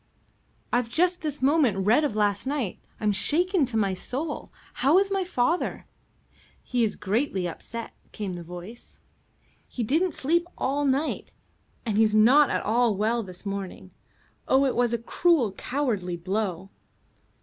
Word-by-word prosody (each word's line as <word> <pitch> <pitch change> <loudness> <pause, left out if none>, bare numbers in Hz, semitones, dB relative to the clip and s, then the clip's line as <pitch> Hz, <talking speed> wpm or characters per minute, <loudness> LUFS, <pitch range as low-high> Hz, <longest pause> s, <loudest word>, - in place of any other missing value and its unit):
"I've 245 -1 +1
just 355 +6 +1
this 295 -4 -3
moment 260 -10 +3
read 240 +9 +4
of 285 -8 -1
last 205 +2 +1
night. 270 -9 -2 0.2
I'm 210 -1 +1
shaken 345 - +2
to 240 -3 -3
my 200 -3 +1
soul. 275 - -5 0.3
How 285 +7 +5
is 395 +1 +2
my 390 -1 +1
father?" 345 -1 -1 0.8
"He's 235 -4 0
greatly 200 -3 -1
upset," 230 +7 -7 0.2
came 200 -3 -4
the 175 - -6
voice. 180 +7 -10 0.7
"He 245 - -4
didn't 315 - +1
sleep 340 +5 +1
all 285 +2 0
night, 275 +3 -1 0.5
and 215 -2 0
he's 215 -1 +4
not 260 +7 +6
at - - -1
all 230 0 +2
well 225 +3 +1
this 185 -2 -11
morning. 195 -2 -5 0.6
Oh, 265 +1 +4
it 265 - 0
was 240 -1 +2
a 235 - +1
cruel, 255 - +2
cowardly 205 -7 -2
blow." 190 0 -3
235 Hz, 150 wpm, -26 LUFS, 205-290 Hz, 0.8 s, not